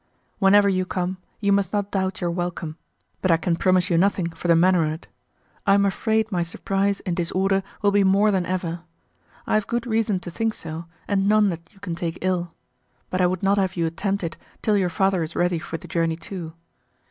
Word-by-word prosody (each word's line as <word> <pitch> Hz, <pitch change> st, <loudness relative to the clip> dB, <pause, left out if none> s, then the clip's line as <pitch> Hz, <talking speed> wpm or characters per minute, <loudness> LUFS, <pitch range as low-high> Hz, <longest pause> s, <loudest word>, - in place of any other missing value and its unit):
Whenever 200 Hz, 0 st, +6 dB
you 185 Hz, -1 st, +2 dB
come 185 Hz, 0 st, -2 dB, 0.2 s
you 200 Hz, -1 st, +2 dB
must 200 Hz, -2 st, +2 dB
not 205 Hz, -1 st, -1 dB
doubt 190 Hz, -1 st, -1 dB
your 175 Hz, -1 st, 0 dB
welcome, 170 Hz, -2 st, -3 dB, 0.5 s
but 185 Hz, -, +1 dB
I 165 Hz, -, +5 dB
can 170 Hz, +1 st, 0 dB
promise 185 Hz, 0 st, +2 dB
you 165 Hz, -, +4 dB
nothing 185 Hz, -2 st, +1 dB
for 165 Hz, +2 st, -6 dB
the 170 Hz, -, +6 dB
manner 180 Hz, +1 st, +4 dB
on't. 155 Hz, +2 st, -4 dB, 0.6 s
I 195 Hz, -, +6 dB
am 200 Hz, 0 st, +4 dB
afraid 220 Hz, +2 st, 0 dB
my 180 Hz, -2 st, 0 dB
surprise 195 Hz, +4 st, -1 dB
and 180 Hz, -3 st, -2 dB
disorder 190 Hz, +3 st, +1 dB, 0.2 s
will 205 Hz, -, +4 dB
be 200 Hz, 0 st, +4 dB
more 200 Hz, +2 st, +4 dB
than 190 Hz, -2 st, +1 dB
ever. 175 Hz, -2 st, -2 dB, 0.6 s
I -, -, -1 dB
have 215 Hz, -2 st, +2 dB
good 235 Hz, 0 st, -1 dB
reason 220 Hz, -4 st, +1 dB
to 175 Hz, -, -7 dB
think 225 Hz, +4 st, -1 dB
so, 165 Hz, +1 st, -6 dB, 0.2 s
and 200 Hz, -1 st, +1 dB
none 215 Hz, -1 st, +5 dB
that 170 Hz, -2 st, -6 dB
you 200 Hz, -, -22 dB
can 180 Hz, -3 st, -4 dB
take 170 Hz, -1 st, -3 dB
ill. 180 Hz, -2 st, -1 dB, 0.6 s
But 185 Hz, -, 0 dB
I 180 Hz, -, +5 dB
would 185 Hz, +1 st, -2 dB
not 200 Hz, +1 st, +3 dB
have 190 Hz, -1 st, 0 dB
you 170 Hz, -2 st, 0 dB
attempt 195 Hz, +4 st, -2 dB
it 165 Hz, -1 st, -4 dB, 0.3 s
till 215 Hz, -, +3 dB
your 190 Hz, -3 st, +2 dB
father 190 Hz, -1 st, +1 dB
is 160 Hz, +1 st, -4 dB
ready 175 Hz, -1 st, +1 dB
for 165 Hz, 0 st, -5 dB
the -, -, -12 dB
journey 165 Hz, -1 st, 0 dB
too. 165 Hz, -1 st, -7 dB
185 Hz, 220 wpm, -23 LUFS, 170-200 Hz, 0.6 s, Whenever